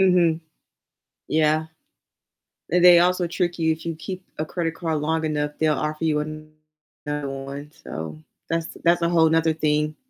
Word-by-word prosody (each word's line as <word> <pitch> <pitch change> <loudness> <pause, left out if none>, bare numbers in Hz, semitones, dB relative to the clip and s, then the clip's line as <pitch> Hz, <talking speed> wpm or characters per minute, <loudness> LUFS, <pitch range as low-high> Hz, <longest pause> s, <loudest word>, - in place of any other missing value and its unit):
Mhm. 175 -4 +4 0.9
Yeah, 155 0 +2 1.0
and 175 +2 +3
they 175 -1 +9
also 180 0 +2
trick 175 0 -1
you, 160 -1 +2
if 160 +1 -4
you 165 -1 -2
keep 185 +3 -7
a 155 - -1
credit 165 0 -3
card 160 -3 -1
long 160 +1 0
enough, 150 -1 -1
they'll 155 -1 +2
offer 155 +2 -3
you 155 -2 +2
another 155 -1 -7
one, 140 +2 -7
so 80 -1 -6 0.3
that's 165 0 -1 0.2
that's 170 +1 +4
a 170 - +2
whole 165 -2 +4
'nother 160 0 +3
thing. 150 0 +1
160 Hz, 160 wpm, -24 LUFS, 150-170 Hz, 1.0 s, they